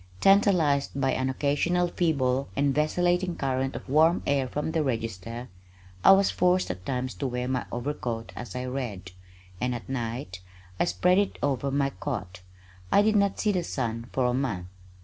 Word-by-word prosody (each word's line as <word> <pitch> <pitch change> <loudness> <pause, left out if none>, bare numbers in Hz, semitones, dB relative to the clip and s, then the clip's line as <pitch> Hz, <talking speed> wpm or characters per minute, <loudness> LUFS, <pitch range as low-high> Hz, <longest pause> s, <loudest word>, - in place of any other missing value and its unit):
Tantalized 170 -9 +3
by 135 -1 +2
an 130 0 0
occasional 145 +6 +1
feeble 140 -7 0
and 140 0 +2
vacillating 175 +4 +1
current 135 0 -1
of - - -7
warm 160 +5 +4
air 140 -2 +1
from 150 +4 -3
the 160 - +1
register, 115 -2 -3 0.6
I - - +9
was 195 0 +4
forced 180 - +2
at 90 0 -9
times 125 -1 -2
to 140 - -3
wear 125 0 -3
my 130 -1 -2
overcoat 120 -3 -4
as 120 -6 -7
I 125 0 -3
read, 120 -8 -5 0.5
and 125 0 0
at 120 - -8
night 115 -7 -4 0.4
I - - +3
spread 180 +2 +3
it 200 - -1
over 140 -1 0
my 140 0 +1
cot. 95 -12 -5 0.5
I 205 - +5
did 215 0 +2
not 200 -1 +2
see 210 - +2
the 180 -3 0
sun 115 -6 -3
for 130 - +1
a 125 - +2
month. 120 -9 -2
135 Hz, 175 wpm, -27 LUFS, 125-165 Hz, 0.6 s, I